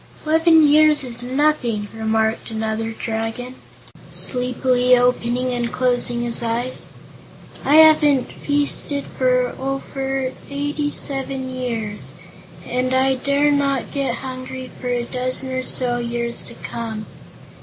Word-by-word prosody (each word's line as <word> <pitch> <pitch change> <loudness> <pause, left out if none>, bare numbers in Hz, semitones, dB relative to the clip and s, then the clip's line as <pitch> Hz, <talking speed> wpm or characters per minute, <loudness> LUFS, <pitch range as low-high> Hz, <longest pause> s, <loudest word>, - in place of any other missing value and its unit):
"Eleven 320 0 +5
years 300 0 +5
is 240 -2 -3
nothing," 250 -5 0
remarked 220 0 -1
another 220 0 -2
Dragon, 225 +3 -4 0.6
sleepily 250 0 +3
opening 250 0 +1
and 240 -1 -2
closing 245 -1 0
his 235 -1 -1
eyes; 235 +2 -2 0.8
"I 290 - +3
haven't 305 -4 +6
feasted 285 0 0
for 265 +1 -1 0.2
eighty 290 +1 -2
seven 270 -2 -3
years, 225 -5 -4 0.5
and 255 +1 -1
I 265 +1 +3
dare 280 +3 +1
not 275 -3 0
get 275 -2 -1
hungry 255 0 -7
for 250 - -4
a 245 -1 0
dozen 255 +2 0
or 255 0 -1
so 245 -1 0
years 235 0 -2
to 235 - -7
come. 220 -2 -6
255 Hz, 115 wpm, -20 LUFS, 240-275 Hz, 0.8 s, haven't